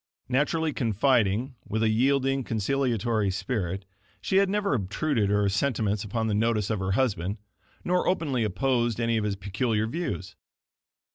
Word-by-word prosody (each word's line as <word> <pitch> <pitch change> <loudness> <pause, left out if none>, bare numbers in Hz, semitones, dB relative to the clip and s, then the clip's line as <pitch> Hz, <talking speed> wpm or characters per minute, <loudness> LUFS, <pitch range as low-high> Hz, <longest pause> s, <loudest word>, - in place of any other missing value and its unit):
Naturally 150 +4 +1
confiding, 120 +1 +1
with 110 +2 -1
a 110 - +3
yielding, 135 +3 +2
conciliatory 115 -2 0
spirit, 95 -1 -3 0.3
she 190 - 0
had 195 -1 +4
never 205 -4 0
obtruded 110 +1 0
her 105 0 +2
sentiments 105 -1 0
upon 110 +2 -2
the 110 - 0
notice 110 -1 +1
of 110 - -1
her 95 0 -1
husband, 100 -5 0 0.5
nor 180 0 +1
openly 145 -10 +1
opposed 120 +2 0
any 115 -1 +1
of 110 - 0
his 105 -1 -1
peculiar 105 +3 -1
views. 110 - -4
115 Hz, 145 wpm, -27 LUFS, 100-135 Hz, 0.5 s, had